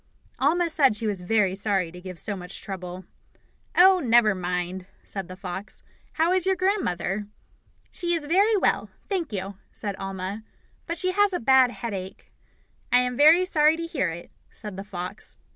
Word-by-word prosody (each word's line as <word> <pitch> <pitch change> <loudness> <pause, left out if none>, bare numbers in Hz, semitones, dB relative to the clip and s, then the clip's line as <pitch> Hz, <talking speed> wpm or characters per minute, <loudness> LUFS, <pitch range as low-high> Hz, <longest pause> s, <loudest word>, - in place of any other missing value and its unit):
Alma 335 +6 +2
said 280 -8 +3
she 220 - -4
was 205 -4 -2
very 195 0 +2
sorry 195 -3 -1
to 180 +1 -11
give 185 -1 -8
so 205 +4 -3
much 180 -1 -8
trouble. 185 -2 -7 0.7
"Oh, 370 +1 +7
never 235 - +4
mind," 180 0 -3 0.2
said 195 -3 -5
the 185 - -8
fox. 190 +1 -7 0.3
"How 330 +3 +2
is 370 0 +3
your 380 - +3
grandmother?" 210 - -1 0.6
"She 345 -1 -1
is 320 -3 -1
very 400 +7 +3
well, - - +1 0.2
thank 360 - -2
you," 195 -1 -5
said 205 -3 -4
Alma, 195 +2 -5 0.5
"but 335 0 -3
she 370 +2 0
has 410 +1 +3
a 355 - 0
bad 260 +1 +5
headache." 200 -5 -7 0.6
"I 245 - +6
am 250 0 -2
very 315 +7 +6
sorry 310 -3 +4
to 335 - -4
hear 320 - -1
it," 170 +1 -8 0.2
said 210 -3 -7
the 195 - -6
fox. 190 0 -7
215 Hz, 175 wpm, -25 LUFS, -, 0.7 s, Oh